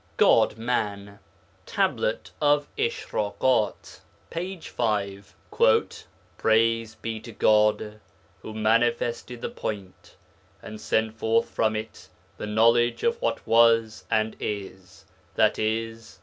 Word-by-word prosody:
GOD - - +4
MAN 100 -4 -3 0.5
Tablet - - -1
of 145 0 +3
Ishrakat 110 0 -1 0.3
(p. 180 +2 -4
5). 100 -8 -3 1.0
Praise 115 0 +2
be 115 -1 -5
to 115 +2 -11
God 105 0 +2 0.4
who - - -8
manifested 120 +2 0
the - - -3
Point 100 -3 -7 0.4
and 110 0 -10
sent 110 0 0
forth 115 +1 +2
from 110 -1 +1
it 110 +1 -7 0.3
the - - -4
knowledge 115 +3 +3
of 470 0 0
what - - -2
was 115 -1 +3
and 110 0 0
is 95 -3 -6 0.3
(i.e. 115 +1 +1
110 Hz, 105 wpm, -25 LUFS, 105-115 Hz, 1.0 s, GOD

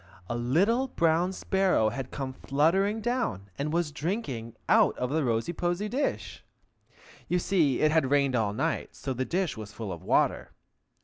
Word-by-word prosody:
A 120 - -3
little 190 - +2
brown 170 -4 +2
sparrow 190 - +1
had 130 +2 -5
come 135 -2 -5
fluttering 190 +12 +1
down, 210 - -2
and 150 +2 -1
was 170 -2 0
drinking 145 - -4
out - - +4
of 125 +1 -2
the 155 +1 +1
rosy 115 +6 0
posy 175 +4 -1
dish. 270 +6 -3 0.8
(You 180 - +1
see, 170 -7 +2
it 155 - +4
had 155 -4 +2
rained 140 -2 +2
all 110 -4 +1
night, 105 - -2
so 135 - -4
the 130 +1 -2
dish 180 +2 -1
was 105 -1 -7
full 110 -2 -6
of 85 - -9
water.) - - +1
150 Hz, 170 wpm, -28 LUFS, 125-185 Hz, 0.8 s, out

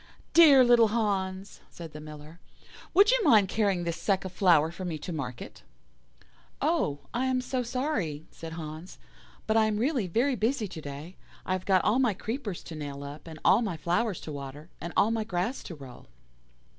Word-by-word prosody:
"'Dear 295 -6 +8
little 240 -2 +6
Hans,' 200 -3 -2
said 165 -2 -10
the 150 - -8
Miller, 150 +2 -11 0.5
'would 400 +5 +6
you - - +2
mind 210 - +5
carrying 200 -4 +1
this 170 0 -3
sack 195 -2 0
of 190 - -5
flour 165 -5 +4
for 185 - -8
me 170 -3 -3
to 170 +4 -6
market?' 125 -6 -6 1.0
"'Oh, 230 - 0
I 255 +2 0
am 260 -1 +1
so 255 0 -2
sorry,' 235 - -2
said 165 -1 -9
Hans, 160 +2 -8 0.5
'but 220 - 0
I 220 -1 +5
am 215 -1 -1
really 245 -3 0
very 245 +10 +1
busy 225 +1 0
to 165 -4 -8
day. 145 +5 -8 0.3
I - - -4
have 185 -1 -4
got 190 -2 +4
all 220 +5 +2
my 240 -7 +2
creepers 220 - -5
to 165 - -9
nail 140 -2 -6
up, 145 +3 -9
and 160 -1 -9
all 210 - +6
my 195 -8 -2
flowers 180 +5 0
to 155 - -7
water, 145 +3 -8
and 170 - -5
all 215 - +4
my 225 -1 0
grass 205 +5 -2
to 170 - -7
roll. 135 -4 -12
190 Hz, 195 wpm, -28 LUFS, 160-230 Hz, 1.0 s, Dear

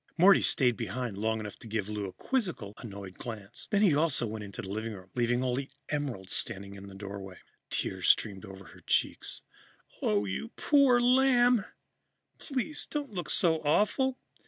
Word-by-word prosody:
Morty 190 +3 +7
stayed 125 -4 +3
behind 115 0 -3
long 110 +2 0
enough 105 -1 -7
to - - -10
give 105 -2 -2
Lou 105 -2 -3
a 95 - -9
quizzical, 180 - -2
annoyed 100 -5 -9
glance. 110 -2 -8
Then 205 0 +3
he 185 -7 +5
also 150 -5 +3
went 110 -1 -5
into 100 -1 -7
the - - -7
living 110 +2 -3
room, 95 -2 -12
leaving 120 +1 +1
only 130 +2 -1 0.2
Emerald 130 -11 -3
standing 100 -4 -1
in 100 0 -10
the 100 - -11
doorway. 95 -1 -7 0.3
Tears - - -2
streamed 100 -3 +3
over 95 -1 -10
her - - -15
cheeks. - - 0 0.6
"Oh, 105 -1 +2
you 100 - -4
poor 275 -4 +5
lamb 245 -2 +4 0.7
please 280 +2 -2
don't 290 -6 -4
look 175 -3 -4
so 165 -3 +3
awful! 215 - +2
120 Hz, 170 wpm, -30 LUFS, -, 0.7 s, Morty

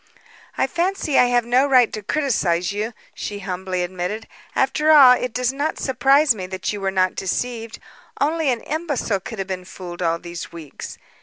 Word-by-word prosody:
"I - - +3
fancy 345 -4 0
I - - +7
have 245 -1 +2
no 250 +4 +3
right 255 -4 +4
to 215 - -4
criticise 200 - 0
you," 215 +3 -3 0.2
she 205 - -5
humbly 185 -2 -3
admitted. 185 +5 -4 0.3
"After 300 +3 +1
all, 285 -5 +9
it 250 -1 -3
does 250 +2 0
not 290 +3 -2
surprise 270 +2 +3
me 185 -4 -6
that 190 +2 -3
you 205 - -5
were 195 - 0
not 185 -1 +1
deceived. 230 +3 -3 0.4
Only 310 +1 +1
an 240 -3 0
imbecile 290 - -2
could 225 +4 -8
have 195 -1 -3
been 185 -1 -4
fooled 180 -1 -9
all 165 -1 +1
these 170 0 -8
weeks. 160 -4 -9
225 Hz, 180 wpm, -22 LUFS, 185-270 Hz, 0.4 s, all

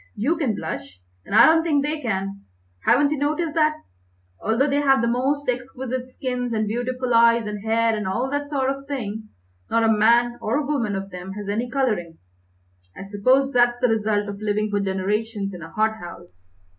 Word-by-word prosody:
"You 250 +11 +1
can 275 -10 -1
blush, 90 - -6 0.3
and - - -2
I - - +9
don't 325 +1 +5
think 295 -4 +1
they 300 +1 -2
can. 195 -4 -3 0.4
Haven't 285 0 +4
you 305 - -1
noticed 305 +2 -1
that, 305 -1 +2 0.7
although 225 +5 +2
they 285 0 +1
have 270 -2 +4
the 235 - +1
most 270 +4 0
exquisite 255 0 -3
skins 250 -2 -3
and 215 -1 0
beautiful 245 +3 -2
eyes 230 0 +5
and 210 -1 -5
hair 225 0 +2
and 210 -2 -3
all 240 +7 -1
that 285 0 -2
sort 270 -2 0
of 275 0 -7
thing, 220 -6 -5 0.4
not 230 - +2
a - - +4
man 235 +3 +3
or 260 +7 0
woman 240 -9 -1
of 195 0 -5
them 180 +1 -7
has 205 0 -7
any 225 +4 -2
colouring? 215 -11 -1 0.8
I - - -7
suppose 255 +8 +2
that's 240 -1 +3
the 250 - +2
result 210 -2 0
of 200 0 -7
living 210 0 -1
for 205 - +1
generations 200 +2 -2
in 180 - -8
a 165 - -8
hothouse." 170 - -4
235 Hz, 190 wpm, -23 LUFS, 205-270 Hz, 0.8 s, I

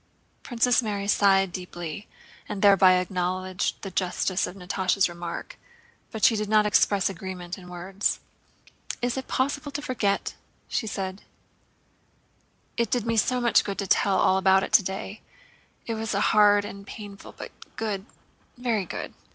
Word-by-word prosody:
Princess 245 0 +2
Mary 205 -3 -3
sighed 195 -2 +4
deeply 175 0 -6 0.4
and 205 -1 -4
thereby 195 -2 +7
acknowledged 185 +1 -1
the 195 - -5
justice 185 +1 0
of 180 - -8
Natásha's 185 +1 +1
remark, 175 -1 -7 0.5
but 220 -2 -7
she 230 - +6
did 210 -1 -2
not 215 -1 +4
express 205 -1 +3
agreement 185 -1 -6
in 180 -2 -13
words. 185 +3 -2 0.8
"Is 245 -1 0
it 265 - -5
possible 285 +2 -1
to 290 - -3
forget?" 225 -8 -1 0.4
said 195 -4 -3
she. - - -14
"It 235 - 0
did 245 -3 0
me 230 0 0
so 250 +3 +2
much 240 -1 +4
good 200 -1 -4
to 200 - -2
tell 195 +1 +3
all 190 0 +3
about 190 0 +4
it - - -5
today. 195 +1 +1 0.6
It 230 - -2
was 220 0 -3
hard 205 0 +4
and 200 -1 -9
painful, 205 -2 -10
but - - -9 0.2
good, 205 -2 -3 0.5
very 235 -5 0
good!" - - -6
200 Hz, 150 wpm, -26 LUFS, 185-220 Hz, 0.8 s, thereby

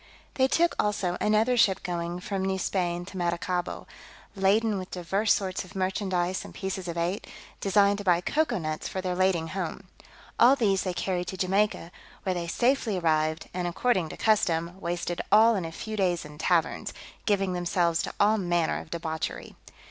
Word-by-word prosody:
They 260 -1 +3
took 340 +5 +2
also 195 -4 -1
another 215 +4 +3
ship 200 -5 +3
going 175 0 -3
from 195 0 -3
New 190 0 0
Spain 175 -2 -1
to 190 0 -9
Maracaibo, 175 0 -2 0.5
laden 205 +2 +2
with 185 - -7
divers 195 +4 0
sorts 190 -2 0
of 185 +2 -15
merchandise 185 -1 -1
and - - -11
pieces 190 -1 -4
of 170 0 -4
eight, 175 +4 -2 0.3
designed 200 0 +3
to - - -5
buy 175 -3 +4
cocoa 305 - 0
nuts 155 -3 -3
for 190 - -4
their 185 -1 -2
lading 180 -3 +1
home: 185 +1 -4 0.6
all 250 +4 +7
these 200 -7 +2
they 185 - -2
carried 180 -2 -2
to 190 - -5
Jamaica, 190 -2 0 0.3
where 190 - 0
they 175 -1 -3
safely 235 +1 +1
arrived, 155 -2 +1
and, 180 -1 -2
according 180 -2 +1
to - - -8
custom, 175 -4 +1
wasted 175 0 -2
all 220 +3 +7
in 190 -6 -1
a 165 - -5
few 215 +6 -6
days 180 -5 0
in 150 0 -12
taverns, 170 0 +1 0.3
giving 195 -3 +2
themselves 175 -1 +1
to - - -5
all 210 +1 +4
manner 175 -3 0
of - - -14
debauchery. 160 -1 -4
185 Hz, 180 wpm, -27 LUFS, 175-200 Hz, 0.6 s, all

